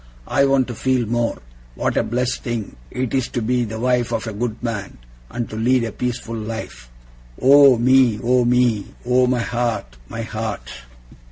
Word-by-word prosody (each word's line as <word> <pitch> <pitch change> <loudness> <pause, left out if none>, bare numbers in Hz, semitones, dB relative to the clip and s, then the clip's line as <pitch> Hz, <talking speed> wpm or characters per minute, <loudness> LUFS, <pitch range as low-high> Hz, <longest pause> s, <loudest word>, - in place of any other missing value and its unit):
I 140 -1 +3
want 135 -2 +2
to - - -3
feel 130 +1 0
more, 120 +1 -1 0.4
what - - -1
a - - +3
blessed 125 +2 -1
thing 115 -4 -4
it 125 -2 -3
is 130 -3 +1
to - - -3
be 125 +1 +1
the 110 0 -6
wife 125 -1 +1
of 115 -1 -2
a 110 - -5
good 115 +2 -4
man, 110 -5 -4 0.3
and 120 -1 -4
to - - -6
lead 120 +3 +2
a 115 - -3
peaceful 120 0 -4
life. 110 - -6 0.5
Oh 140 -1 +7
me, 125 -2 +4
oh 125 +1 +3
me! 120 -4 +2 0.2
Oh 125 +1 +3
my 125 -1 +1
heart, 115 - -2
my 115 - -5
heart! 110 - -5
120 Hz, 180 wpm, -21 LUFS, 110-125 Hz, 0.5 s, Oh